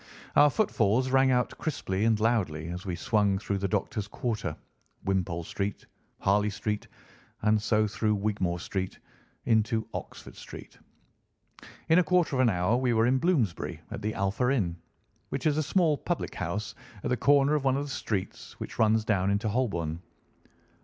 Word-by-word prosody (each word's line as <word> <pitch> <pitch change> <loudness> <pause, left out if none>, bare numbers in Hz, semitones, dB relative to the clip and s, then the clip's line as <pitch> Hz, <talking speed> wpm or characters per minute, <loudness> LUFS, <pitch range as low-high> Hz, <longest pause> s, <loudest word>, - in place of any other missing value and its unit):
Our 145 - +7
footfalls 130 - +1
rang 135 0 +5
out 125 -1 +1
crisply 110 - -1
and 110 -2 +3
loudly 90 -9 0
as 90 +3 -6
we 90 - -1
swung 105 -1 +1
through 100 0 -2
the 100 - 0
doctors' 105 +2 -2
quarter, 110 -7 -3 0.5
Wimpole 90 -3 -1
Street, 100 +4 -4 0.4
Harley 105 +2 +3
Street, 105 +1 -3 0.6
and 105 0 +3
so 110 -1 +2
through 105 0 0
Wigmore 100 -4 -1
Street 95 +2 -4 0.5
into 110 -1 +2
Oxford - - -8
Street. - - -11 1.1
In 165 +2 +6
a - - +4
quarter 170 -2 +2
of - - 0
an 130 -2 +5
hour 90 +4 +2
we 125 -1 +1
were 110 0 +3
in 130 +2 +3
Bloomsbury 140 - 0
at - - -5
the 110 +1 -2
Alpha 105 +5 0
Inn, 95 -11 0 0.5
which 135 - -4
is 150 -2 +3
a - - +3
small 155 +1 +2
public 175 - -3
house 100 +4 -3 0.3
at - - -2
the - - +4
corner 140 +4 +4
of 150 -2 +1
one 135 0 +2
of 140 - -1
the - - -6
streets 105 -8 -4
which - - -7
runs 110 0 +3
down 100 -3 +1
into 100 +3 0
Holborn. 85 -9 -1
110 Hz, 170 wpm, -28 LUFS, 100-130 Hz, 1.1 s, Our